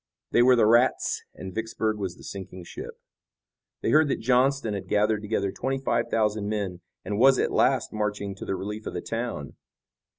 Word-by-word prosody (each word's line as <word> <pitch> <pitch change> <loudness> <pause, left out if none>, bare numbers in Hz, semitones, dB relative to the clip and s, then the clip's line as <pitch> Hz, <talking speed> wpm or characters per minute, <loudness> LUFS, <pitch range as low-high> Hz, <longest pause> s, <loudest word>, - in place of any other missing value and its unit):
They - - +5
were 125 +1 +6
the 115 - +4
rats 120 +4 +3
and 95 0 -8
Vicksburg 110 0 -2
was 95 -3 -3
the - - -15
sinking 95 -2 -8
ship. - - -9 0.8
They - - 0
heard 155 0 +5
that 140 - -1
Johnston 125 -1 +2
had 100 - -5
gathered 105 0 +2
together 100 -2 -1
twenty 135 +5 -2
five 135 - 0
thousand 105 -2 0
men 100 -4 -3 0.2
and 100 +2 -2
was 135 +1 +6
at - - +1
last 130 -3 +2
marching 105 -2 -2
to - - -7
the 95 - -1
relief 105 +3 -5
of - - -5
the - - -2
town. 115 - -4
110 Hz, 190 wpm, -26 LUFS, 100-120 Hz, 0.8 s, were